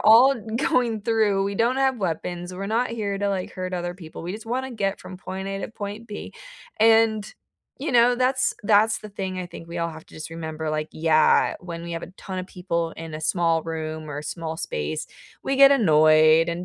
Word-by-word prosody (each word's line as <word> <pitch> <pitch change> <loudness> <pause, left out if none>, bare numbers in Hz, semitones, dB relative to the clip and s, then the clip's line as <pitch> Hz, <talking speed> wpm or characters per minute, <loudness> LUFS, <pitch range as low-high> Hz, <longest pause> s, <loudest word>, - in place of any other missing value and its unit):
all 245 +5 +7 0.2
going 240 -5 +1
through 215 -3 +2
we 200 0 -2
don't 235 +4 +2
have 265 -2 +2
weapons, 175 0 -3
we're 195 +2 -5
not 235 +4 0
here 205 -4 -2
to, 205 - 0
like, 190 -2 -2
hurt 185 0 -5
other 175 0 -3
people, 165 -3 -10
we 175 - -4
just 215 +2 -8
wanna 260 +3 -2
get 200 -3 -1
from 185 0 -9
point 190 +1 -6
A 195 - -3
to - - -4
point 215 +1 -7
B, 210 - -7 0.5
and, 220 -1 +4 0.5
you 290 -2 -2
know, 245 +1 +5
that's 255 +1 +2
that's 215 +1 +4
the 215 - -10
thing 190 -2 -4
I 180 - -4
think 165 -1 -11
we 170 - -5
all 170 0 -1
have 160 0 -11
to - - -17
just 155 +1 -7
remember, 160 -1 -4
like, 155 0 -2
yeah, 155 -1 +3
when 170 -2 -7
we 170 - -6
have 165 - -4
a - - -7
ton 190 -1 -6
of 185 - -4
people 170 -3 -2
in 165 -1 -8
a 155 - -5
small 165 0 +1
room 155 -1 -5
or 145 - -4
a - - -5
small 160 0 -4
space, 75 - -3 0.4
we 270 - -1
get 275 0 +8
annoyed 155 - +5
and 170 +1 -3
185 Hz, 220 wpm, -24 LUFS, 165-220 Hz, 0.5 s, get